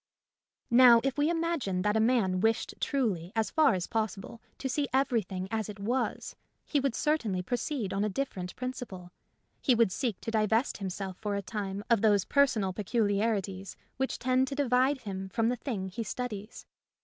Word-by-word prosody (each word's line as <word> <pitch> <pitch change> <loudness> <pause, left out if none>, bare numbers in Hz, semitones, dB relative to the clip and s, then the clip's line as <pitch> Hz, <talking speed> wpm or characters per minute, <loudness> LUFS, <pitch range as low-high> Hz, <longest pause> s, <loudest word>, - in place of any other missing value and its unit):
Now 240 -1 +8
if 270 -1 0
we 295 +2 +2
imagine 325 - -1
that 210 +1 +1
a - - +3
man 220 -6 +2
wished 225 +3 +1
truly, 200 - -1
as 220 -3 0
far 310 -9 +4
as 180 -1 -2
possible, 220 0 -3 0.2
to 270 - -3
see 280 +2 0
everything 225 -8 0
as 220 -2 -2
it 210 - -7
was, 240 +6 -2 0.3
he 290 - +1
would 270 -3 0
certainly 230 -12 0
proceed 245 - -2
on 195 +1 0
a 215 - +1
different 190 -6 -4
principle. 245 -8 -6 0.5
He 255 - +4
would 230 -4 +3
seek 230 -2 -2
to 225 - -4
divest 220 +2 +1
himself 190 -1 -4
for 210 -2 -2
a 200 - -3
time 200 0 -4
of 230 -4 +3
those 205 -3 +4
personal 235 -9 +2
peculiarities 205 -2 -1 0.2
which 265 0 -1
tend 255 +1 +2
to 275 - -4
divide 265 0 +2
him 190 -2 -5
from 225 +3 +1
the 250 - 0
thing 220 -6 -4
he 190 - -5
studies. 220 -1 -5
225 Hz, 175 wpm, -30 LUFS, 195-255 Hz, 0.5 s, Now